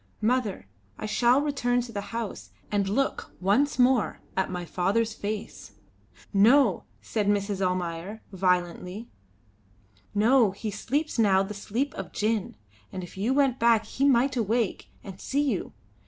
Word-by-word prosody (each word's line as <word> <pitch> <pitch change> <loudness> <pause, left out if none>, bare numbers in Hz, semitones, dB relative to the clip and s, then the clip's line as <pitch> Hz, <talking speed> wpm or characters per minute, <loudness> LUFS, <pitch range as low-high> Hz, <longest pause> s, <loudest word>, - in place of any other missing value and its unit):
Mother, 225 -2 0 0.3
I - - -5
shall 245 +5 +3
return 245 -4 +1
to 240 -1 -8
the 205 -2 -3
house 230 -1 -5 0.2
and 200 -2 +1
look 270 +7 -1
once 210 +10 +2
more 250 -3 +3 0.2
at 190 - 0
my 180 -1 -4
father's 205 +6 0
face." 210 - -6 0.6
"No!" 220 +1 +4 0.2
said 210 -3 -1
Mrs. 200 -1 0
Almayer, 180 +3 -2
violently. 180 +3 -1 1.1
"No, 225 0 +4
he 210 +2 -5
sleeps 280 +7 -2
now 195 -3 +4
the 205 +2 -6
sleep 225 +7 -2
of - - -7
gin; 215 -1 -1 0.4
and 185 - -5
if 175 - -10
you 205 +6 0
went 270 -2 +2
back 230 -1 +4
he 270 - -3
might 265 0 +3
awake 230 -2 -1
and 195 -1 -10
see 285 +2 0
you. 280 - -1
215 Hz, 145 wpm, -27 LUFS, 195-245 Hz, 1.1 s, No